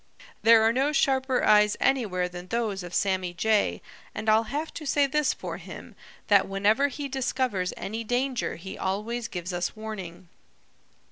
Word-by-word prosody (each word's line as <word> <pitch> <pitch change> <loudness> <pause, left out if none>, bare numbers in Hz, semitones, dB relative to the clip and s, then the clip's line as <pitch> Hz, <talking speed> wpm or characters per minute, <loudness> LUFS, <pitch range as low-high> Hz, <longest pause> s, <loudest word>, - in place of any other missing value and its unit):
"There 225 -1 +6
are 225 +1 +4
no 270 +4 +1
sharper 265 -3 +1
eyes 210 0 +5
anywhere 205 -9 +1
than 180 0 -9
those 220 -3 -2
of 175 0 -7
Sammy 185 -3 0
Jay, 215 +2 +1 0.3
and 220 - -2
I'll 220 +1 +4
have 295 +7 -4
to 310 - -7
say 285 0 +3
this 295 0 +1
for - - -6
him, - - -10 0.3
that 200 -3 +4
whenever 205 +8 +2
he 285 +1 -5
discovers 255 -8 -1
any 225 +3 -4
danger 245 +2 -1
he 190 +3 -9
always 220 +5 -2
gives 180 -2 -5
us 175 +3 -2
warning. 195 -5 -7
220 Hz, 160 wpm, -26 LUFS, 190-260 Hz, 0.3 s, There